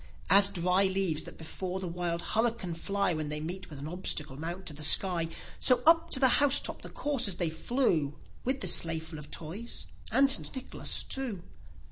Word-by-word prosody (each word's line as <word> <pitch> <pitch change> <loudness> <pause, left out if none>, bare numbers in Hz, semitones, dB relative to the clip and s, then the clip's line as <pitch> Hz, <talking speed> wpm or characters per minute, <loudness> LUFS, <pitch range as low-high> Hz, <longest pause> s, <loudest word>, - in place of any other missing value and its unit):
s 200 +1 +8
dry 185 +1 +2
leaves 190 -5 -1
that - - -10
before 180 +3 -5
the 190 - -4
wild 170 0 -3
hurricane 225 -5 0
fly, 195 +2 0
When 155 -2 -3
they 150 0 -3
meet 180 +5 -5
with 150 - -9
an 140 +2 -6
obstacle, 155 -5 -2
mount 170 +6 -6
to 155 - -4
the 150 - -9
sky; 165 +2 +3 0.3
So 250 -1 +3
up 330 +1 +5
to 265 - +3
the 260 - +6
house 285 0 +5
top - - -6
the - - -8
coursers 255 -10 0
they 170 -3 -1
flew, 160 - 0 0.3
With 260 +2 -1
the 185 - 0
sleigh 165 -1 +4
full 160 -1 -8
of 150 0 -10
Toys, 180 +11 -5 0.3
and 270 +5 +5
St. 275 +1 0
Nicholas 260 - -4
too. 240 -10 -4
185 Hz, 195 wpm, -30 LUFS, 160-235 Hz, 0.3 s, s